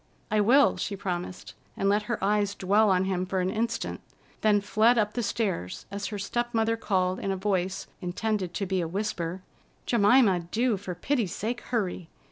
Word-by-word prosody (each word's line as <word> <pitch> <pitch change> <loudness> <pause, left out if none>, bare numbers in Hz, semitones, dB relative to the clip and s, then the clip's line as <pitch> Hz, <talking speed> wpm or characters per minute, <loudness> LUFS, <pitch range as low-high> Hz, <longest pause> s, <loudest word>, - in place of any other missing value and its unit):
"I 215 0 +3
will," 260 +7 +5
she 205 - -3
promised, 180 -2 -5 0.2
and 195 - 0
let 205 +1 +3
her 235 - 0
eyes 205 0 +1
dwell 205 +3 +3
on 185 0 +3
him 185 -1 0
for 185 +1 -2
an 185 +1 0
instant; 230 +2 -2 0.4
then 210 -1 +4
fled 220 +4 +3
up 210 -1 +1
the 245 - -1
stairs 200 - -2
as 200 0 -3
her 210 - -5
step 240 +4 -2
mother 225 0 +2
called 185 -4 0
in 195 - -2
a 190 - -1
voice 190 -1 -1 0.2
intended 185 +1 -2
to 200 - -1
be 190 -1 0
a 165 - -2
whisper: 185 -1 -3 0.4
"Jemima, 210 -3 +4
do, 235 +2 +1
for 185 -2 -6
pity's 235 -5 -1
sake, 235 +4 -3
hurry! 185 -7 -3
200 Hz, 185 wpm, -27 LUFS, 185-220 Hz, 0.4 s, will